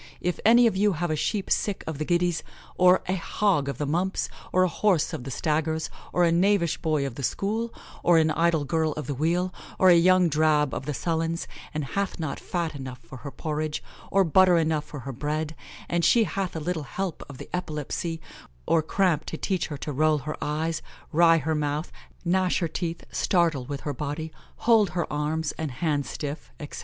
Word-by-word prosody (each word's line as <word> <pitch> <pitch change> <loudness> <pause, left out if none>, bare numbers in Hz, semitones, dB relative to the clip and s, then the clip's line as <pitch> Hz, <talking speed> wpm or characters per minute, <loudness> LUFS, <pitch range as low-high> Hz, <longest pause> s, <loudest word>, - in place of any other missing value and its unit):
If 180 0 -2
any 235 +2 +7
of 225 - +3
you 205 +1 +3
have 170 0 -2
a - - +1
sheep 195 +6 -1
sick 205 -2 0
of 160 -3 -5
the 155 - -1
giddies, 175 0 +1 0.3
or 180 0 +5
a 185 - +1
hog 175 -5 +1
of 140 - -4
the 150 - -1
mumps, 175 +6 0 0.2
or 185 - +4
a - - +4
horse 185 -2 +1
of 125 - -5
the - - -5
staggers, 160 +3 -1 0.2
or 180 - +2
a 170 - +4
knavish 175 -1 +2
boy 155 -4 0
of 135 - -4
the 140 - -7
school, 215 - -1 0.3
or 175 -1 +5
an 160 -1 +4
idle 165 -1 +2
girl 160 +2 +1
of 150 - -5
the 145 - -2
wheel, 175 +6 0 0.2
or 185 - +6
a - - +8
young 180 +1 +5
drab 150 -2 +2
of 135 - -4
the 150 - -2
sullens, 165 +1 -1 0.2
and 155 -2 -2
hath 195 +6 -2
not 155 -4 -3
fat 170 -3 -2
enough 130 -3 -7
for 125 +2 -12
her 140 - -7
porridge, 155 +1 -3 0.3
or 195 0 +4
butter 185 +1 +5
enough 155 -2 +1
for 145 - -8
her 135 - -5
bread, 155 +4 -2 0.3
and 175 0 0
she 230 +7 +5
hath 195 -4 -3
a - - -2
little 165 +1 -2
help 175 +4 -4
of 140 - -9
the - - -9
epilepsy 165 0 -3 0.5
or 165 - +3
cramp 170 0 +1
to 160 - -5
teach 185 -1 -1
her 145 - -5
to 150 - -5
roll 155 +2 +3
her 150 +2 -4
eyes, 160 +2 -1 0.3
wry 165 +1 +6
her 160 +1 -1
mouth, 150 +1 -2 0.3
gnash 185 +1 +2
her 170 - 0
teeth, 165 +1 -4
startle 165 -8 +1
with 140 +1 -5
her 145 - -3
body, 150 +4 -4 0.2
hold 220 -4 +4
her 170 - +1
arms 150 +1 -1
and 160 -2 -2
hands 145 -1 -1
stiff, 145 +1 -5
etc. 145 - -7
160 Hz, 210 wpm, -26 LUFS, 150-180 Hz, 0.5 s, a